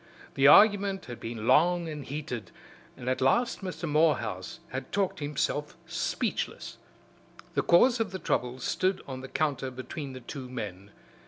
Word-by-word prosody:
The 135 0 +4
argument 200 +1 +6
had 120 -1 -8
been 115 -1 -5
long 175 +1 +4
and 150 -2 -5
heated, 130 - -5 0.5
and 125 - -9
at 130 0 0
last 235 - +2
Mr. 170 -3 -4
Morehouse 145 - +1
had 130 0 -6
talked 195 -5 0
himself 150 0 -2
speechless. - - -3 0.8
The - - +2
cause 240 +8 +5
of 225 -3 0
the 190 - -5
trouble 125 -8 -1
stood 185 +8 0
on 130 -1 -6
the 130 - -7
counter 140 -3 -1
between 130 +2 -7
the 130 - -7
two 130 +1 -7
men. 100 -6 -6
145 Hz, 155 wpm, -29 LUFS, 125-175 Hz, 0.8 s, argument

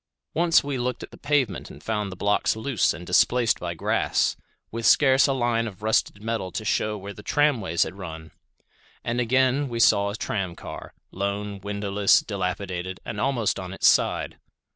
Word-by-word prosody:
Once 170 0 +4
we 140 -2 -3
looked 125 0 -2
at - - -10
the - - -12
pavement 140 -8 0
and - - -13
found 105 -3 -2
the - - -7
blocks 100 +4 +1
loose 110 -2 +1
and 90 - -7
displaced 115 +6 +3
by 85 -1 -4
grass, - - +1 0.4
with 115 +1 -5
scarce 135 +2 +5
a - - +1
line 120 -3 0
of 100 -1 -10
rusted 110 -1 0
metal 110 -5 -3
to 110 - -5
shew 105 0 0
where 100 +1 -8
the 105 - -11
tramways 115 - +1
had 80 - -6
run. 80 -3 -8 0.7
And 120 +1 -1
again 130 +3 +2
we 115 -1 -4
saw 100 -3 +4
a 100 - -4
tram 95 -5 -3
car, - - -9 0.2
lone, 100 +1 -3
windowless, 100 0 +2
dilapidated, 95 -2 -4
and 105 - -4
almost 120 -7 0
on 95 0 -6
its - - -2
side. - - +2
105 Hz, 180 wpm, -25 LUFS, 95-120 Hz, 0.7 s, scarce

